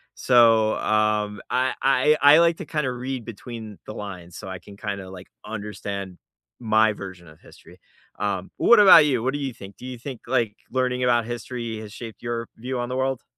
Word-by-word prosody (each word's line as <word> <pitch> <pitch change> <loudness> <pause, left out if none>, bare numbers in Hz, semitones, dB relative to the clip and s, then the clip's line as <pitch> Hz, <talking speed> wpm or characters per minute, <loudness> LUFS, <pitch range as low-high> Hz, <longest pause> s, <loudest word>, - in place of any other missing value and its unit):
so, 115 -3 +4
um, 105 -1 0
I 130 +1 +1
I 135 +3 +3
I 145 +2 +8
like 170 -1 +3
to - - -7
kinda 150 -5 -2
read 125 0 -5
between 115 -2 -9
the - - -7
lines 90 -5 -8
so 95 - -8
I 95 - -5
can 100 - -14
kinda, 100 -3 -5
like, 95 0 -11 0.2
understand 100 -3 -6 0.4
my 110 -1 +3
version 95 -4 -10
of 75 0 -16
history, - - -17 0.4
um, 100 -2 -2
what 235 -2 +6
about 185 -6 +9
you, 130 -6 +1
what 130 - 0
do 145 - -3
you 135 -3 -3
think, 100 -3 -12
do 125 - -11
you 130 -1 -6
think, 130 -1 -8
like, 110 -3 0
learning 125 -1 0
about 120 -2 +2
history 120 -1 -5
has 105 -2 -9
shaped 115 -2 -9
your 120 -1 -4
view 125 +2 -4
on 120 - -3
the 125 - -3
world? 130 -1 -1
115 Hz, 195 wpm, -24 LUFS, 105-130 Hz, 0.4 s, about